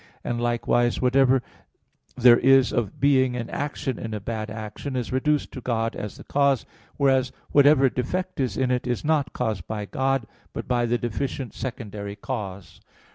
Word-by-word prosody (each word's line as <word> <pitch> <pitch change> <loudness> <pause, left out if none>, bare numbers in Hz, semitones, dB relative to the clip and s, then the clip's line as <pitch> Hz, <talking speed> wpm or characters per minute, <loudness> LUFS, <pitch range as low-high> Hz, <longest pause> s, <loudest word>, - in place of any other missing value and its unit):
And, 120 0 -2
likewise, 120 0 +1
whatever 130 0 +3 0.7
there 120 -1 +7
is 135 0 +5
of 110 -5 -2
being 130 -3 +3
and 120 -2 -4
action 140 -4 -3
in 110 -1 -4
a - - -3
bad 110 +1 -4
action, 110 +5 -6
is 125 -1 -3
reduced 145 +3 +1
to 130 - -7
God 115 -2 -1
as 105 -2 -6
the - - -11
cause; 140 -3 +2 0.3
whereas 135 -2 +3 0.2
whatever 145 -1 +6
defect 180 +10 -3
is 125 -7 -1
in 130 -1 +1
it 125 0 -1
is 125 +3 -2
not 150 -2 +1
caused 105 -6 -3
by 105 -1 -4
God, 135 +2 0 0.3
but - - -5
by 120 -1 +1
the 120 +1 +1
deficient 120 +2 -3
secondary 105 -5 -6
cause. 100 -5 -6
125 Hz, 170 wpm, -25 LUFS, 115-135 Hz, 0.7 s, there